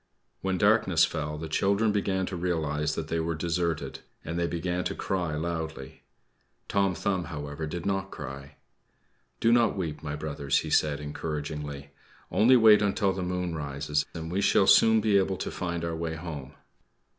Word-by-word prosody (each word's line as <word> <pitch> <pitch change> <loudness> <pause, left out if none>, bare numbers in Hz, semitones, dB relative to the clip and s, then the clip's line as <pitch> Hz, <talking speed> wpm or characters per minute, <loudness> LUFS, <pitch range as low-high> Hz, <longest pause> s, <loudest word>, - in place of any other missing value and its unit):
When 95 -1 0
darkness - - +4
fell, 75 0 -4
the 80 +1 -5
children 100 +7 +2
began 95 -2 0
to 90 - -5
realize 75 -4 -1
that 80 - -4
they 85 +1 -1
were 80 0 -1
deserted, 85 -1 -2 0.3
and 85 +2 -3
they 85 - +1
began 90 +1 -2
to - - -2
cry 90 -5 -2
loudly. 80 -3 -4 0.7
Tom 100 -2 +1
Thumb, 95 0 -1
however, 75 -1 -5
did 85 +2 -5
not 95 -1 -1
cry. 70 -2 -8 0.8
"Do 115 - +3
not 120 -3 +3
weep, 80 -5 -3
my 75 -1 -4
brothers," 70 -2 -1
he - - -6
said 75 -2 +2
encouragingly. 75 -1 -5 0.4
"Only 110 +9 +5
wait 110 -3 +7
until 100 -1 +1
the 95 - -4
moon 90 -1 -2
rises, 75 0 -1
and 80 0 -5
we 95 +3 0
shall 95 - +4
soon 110 +2 +6
be 105 -2 +4
able 95 0 0
to - - -4
find 85 -2 -3
our 85 -1 -2
way 80 0 -3
home." 80 -5 -7
85 Hz, 170 wpm, -28 LUFS, 75-95 Hz, 0.8 s, wait